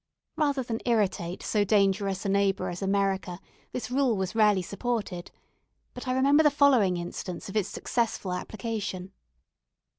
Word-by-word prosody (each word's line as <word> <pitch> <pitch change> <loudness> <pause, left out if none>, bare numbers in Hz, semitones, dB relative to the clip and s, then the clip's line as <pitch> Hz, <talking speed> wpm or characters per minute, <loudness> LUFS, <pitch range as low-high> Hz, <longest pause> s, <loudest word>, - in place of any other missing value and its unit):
Rather 285 -4 +1
than 230 -2 -3
irritate 195 -6 0
so 210 -2 +1
dangerous 195 -1 +1
a - - 0
neighbour 200 0 +1
as 175 +2 -6
America, 195 -2 0 0.3
this 245 -1 -5
rule 255 -4 +2
was 190 0 -2
rarely 210 -4 +3
supported; 205 -3 -3 0.6
but 250 +1 -8
I 255 - +1
remember 280 +4 +4
the 300 - +5
following 260 -11 +4
instance 175 +2 -6
of 195 - -8
its 205 -3 +1
successful 225 -6 -2
application. 200 -2 -4
205 Hz, 145 wpm, -27 LUFS, 190-240 Hz, 0.6 s, the